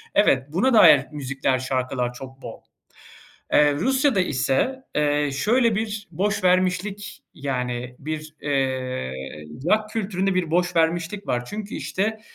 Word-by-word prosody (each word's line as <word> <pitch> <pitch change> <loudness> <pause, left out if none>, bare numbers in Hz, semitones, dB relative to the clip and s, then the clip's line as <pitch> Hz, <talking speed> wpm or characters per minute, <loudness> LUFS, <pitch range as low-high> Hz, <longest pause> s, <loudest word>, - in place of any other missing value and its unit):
Evet. 135 -10 +4
Buna 240 +9 +2
dair 145 -10 +7
müzikler, 135 -2 -1
şarkılar 130 -1 -2
çok 135 +1 -11
bol. 115 - -9 0.9
Eee, 145 -1 +5
Rusya'da 265 - +2
ise, 180 - 0
eee, 145 -1 +1
şöyle 230 - +2
bir 215 -2 -3
boşvermişlik, 185 +2 0
yani, 125 -3 -3
bir, 155 +1 -6
eee, 130 - -1 0.6
rock 215 0 +2
kültüründe 195 -3 -1
bir 180 -4 0
boşvermişlik 175 +2 0
var. 120 0 -1
Çünkü, 210 +9 -6
işte, 215 +3 -2
165 Hz, 115 wpm, -23 LUFS, 135-205 Hz, 0.9 s, dair